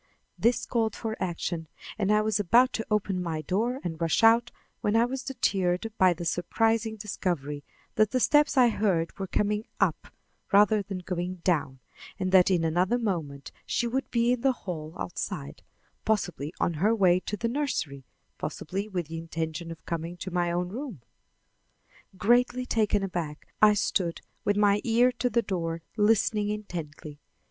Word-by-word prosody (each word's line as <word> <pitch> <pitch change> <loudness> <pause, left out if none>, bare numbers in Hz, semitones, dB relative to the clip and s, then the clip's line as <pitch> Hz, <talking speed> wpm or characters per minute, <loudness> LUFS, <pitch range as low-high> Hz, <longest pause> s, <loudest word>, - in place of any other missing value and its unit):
This 235 +2 +1
called 225 -3 0
for 220 -1 -4
action, 170 -2 -3 0.3
and 205 -1 0
I 210 0 +4
was 215 -1 0
about 235 +6 +4
to 225 - -2
open 200 -3 0
my 160 -3 -3
door 230 - 0
and 165 -2 -5
rush 165 +6 +1
out 230 +2 +6 0.3
when 210 - 0
I 230 +1 +5
was 260 +1 -4
deterred 200 -6 -1
by 185 -1 +6
the 170 +1 -6
surprising 225 +5 +1
discovery 170 -9 -3 0.3
that 215 -1 +4
the 255 - 0
steps 295 +2 +3
I 250 -2 +7
heard 190 -7 0
were 195 - -3
coming 210 +2 0 0.2
up - - +1 0.4
rather 210 +1 +5
than 190 -2 -6
going 180 0 -3
down, 140 -7 0 0.4
and 185 -1 -1
that 185 -1 +6
in 175 -3 +2
another 180 +8 +2
moment 165 - -3
she - - -1
would 260 +3 -2
be 235 0 +2
in 250 -1 0
the 265 0 +3
hall 160 -4 -5
outside, 70 -5 -5 0.4
possibly 175 -9 -1
on 170 - +1
her 215 +4 +4
way 185 -4 +4
to 210 +3 -5
the 230 - -1
nursery, 230 - -2 0.4
possibly 195 +6 -4
with 180 -5 -3
the 165 +2 -6
intention 165 0 -4
of 165 -1 -10
coming 170 +1 -4
to 185 +1 -6
my 175 -1 0
own 175 +1 -1
room. 230 - -7 1.1
Greatly 245 +4 +3
taken 210 -4 +1
aback, 170 -5 -4
I 210 -1 +7
stood 180 -4 0 0.2
with 205 0 +2
my 205 0 +4
ear 240 +2 +4
to 250 - +1
the 235 0 +1
door, 165 -5 -3
listening 210 -1 +2
intently. 165 -8 -6
195 Hz, 170 wpm, -27 LUFS, 170-225 Hz, 1.1 s, I